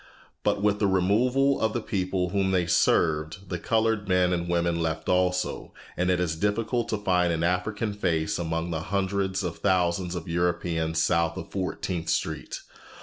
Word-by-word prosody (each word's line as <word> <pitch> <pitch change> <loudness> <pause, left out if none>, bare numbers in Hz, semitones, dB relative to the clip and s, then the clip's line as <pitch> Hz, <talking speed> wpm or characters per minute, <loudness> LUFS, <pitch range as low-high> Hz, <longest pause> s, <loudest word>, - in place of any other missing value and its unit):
But 100 - +1
with 105 -1 +2
the 100 - +2
removal 120 +9 +2
of 110 0 +1
the - - 0
people 95 -4 -1
whom 95 +1 +1
they 90 -2 +2
served, 80 +2 +1
the 90 - -3
colored 110 0 0
men 90 -1 +3
and 85 0 -2
women 85 -1 +1
left 80 -1 -2
also, 90 0 0 0.2
and 90 +1 0
it 90 -1 +2
is 85 -3 0
difficult 110 +6 -1
to 110 - 0
find 90 -4 +1
an 80 0 -1
African 105 +5 -1
face 85 -6 -1
among 80 0 -2
the 80 -1 -2
hundreds 95 +1 -1
of 85 -3 -4
thousands 90 -2 +1
of 85 -2 -5
Europeans 85 -1 0
south 85 +1 +1
of - - -7
Fourteenth 90 -3 -3
Street. - - -2
90 Hz, 170 wpm, -26 LUFS, 85-100 Hz, 0.2 s, men